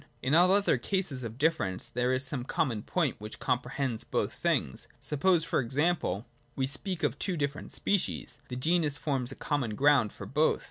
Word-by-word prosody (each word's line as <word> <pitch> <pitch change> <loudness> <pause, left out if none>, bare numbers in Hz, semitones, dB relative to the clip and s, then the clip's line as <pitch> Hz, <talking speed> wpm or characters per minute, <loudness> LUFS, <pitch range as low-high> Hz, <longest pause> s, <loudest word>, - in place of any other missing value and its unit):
In 130 +3 +1
all 175 +3 +6
other 200 +1 +3
cases 180 -10 -1
of 115 0 -6
difference 145 - +1
there 125 +1 0
is 130 +1 +1
some 130 -2 -1
common 125 -4 -1
point 155 +1 0
which 105 +1 -7
comprehends 125 -1 -1
both - - -1
things. 65 - -1
Suppose 165 +3 +2
e.g. 145 +6 +2 0.6
we 135 - +1
speak 175 +5 -3
of 145 - 0
two 185 -3 -1
different 140 -1 -3
species: 170 - -1
the 125 - -5
genus 155 +2 +2
forms 135 -5 -1
a - - -7
common 130 -8 -1
ground 140 -4 +4
for - - -9
both. 150 +3 +2
140 Hz, 175 wpm, -30 LUFS, 125-160 Hz, 0.6 s, all